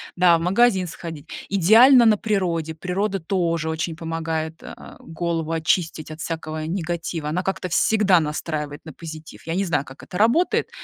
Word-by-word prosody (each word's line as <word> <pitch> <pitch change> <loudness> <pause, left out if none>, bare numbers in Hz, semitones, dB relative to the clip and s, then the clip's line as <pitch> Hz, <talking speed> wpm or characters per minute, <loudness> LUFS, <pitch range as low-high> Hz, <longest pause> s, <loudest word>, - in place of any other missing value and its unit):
да, 175 -2 +5
в - - -5
магазин 190 +1 +3
сходить. 160 -3 -8 0.2
Идеально- 225 +7 +6
на 215 -2 +5
природе, 175 -7 -1
природа 195 +5 -2
тоже 170 -2 -1
очень 160 +1 -3
помогает, 160 -1 -4
э, - - -9 0.2
голову 165 -1 -3
очистить 160 -1 -1
от 155 - -8
всякого 155 -1 -4
негатива, 165 -2 -3
она 170 +4 -1
как-то 190 -1 -2
всегда 200 0 +3
настраивает 150 -1 -4
на 155 - -9
позитив. 160 0 -10
Я 165 - -2
не 195 +2 0
знаю, 145 -5 0
как 135 - -13
это 180 - -7
работает, 240 - +2
165 Hz, 160 wpm, -22 LUFS, 160-190 Hz, 0.2 s, Идеально